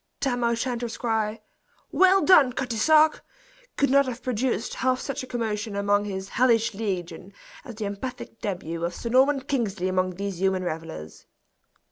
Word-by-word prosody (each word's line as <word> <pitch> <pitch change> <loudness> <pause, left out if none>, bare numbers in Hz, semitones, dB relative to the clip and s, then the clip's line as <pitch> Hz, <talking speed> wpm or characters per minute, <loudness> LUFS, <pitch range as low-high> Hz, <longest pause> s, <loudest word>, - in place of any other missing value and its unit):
Tam 245 -3 -1
O'Shanter's 235 0 -1
cry, 220 -2 -1 0.5
"Weel 380 +1 +5
done, 290 -9 +6
Cutty 245 -3 -3
sark!" 310 +5 +4 0.5
could 280 -2 +2
not 280 0 +4
have 250 -1 -6
produced 245 -1 -1
half 255 0 0
such 275 - -4
a 255 - -8
commotion 220 -3 -3
among 205 0 +1
his 190 -1 -5
"hellish 235 -2 +2
legion" 190 -3 -5 0.3
as 240 -5 -9
the 215 -1 -4
emphatic 225 +3 -6
debut 170 -4 -4
of 170 0 -2
Sir 235 - -5
Norman 265 +3 +4
Kingsley 220 -9 -2
among 185 -1 0
these 195 -1 -5
human 190 -1 +1
revelers. 155 - -7
225 Hz, 155 wpm, -25 LUFS, 195-255 Hz, 0.5 s, done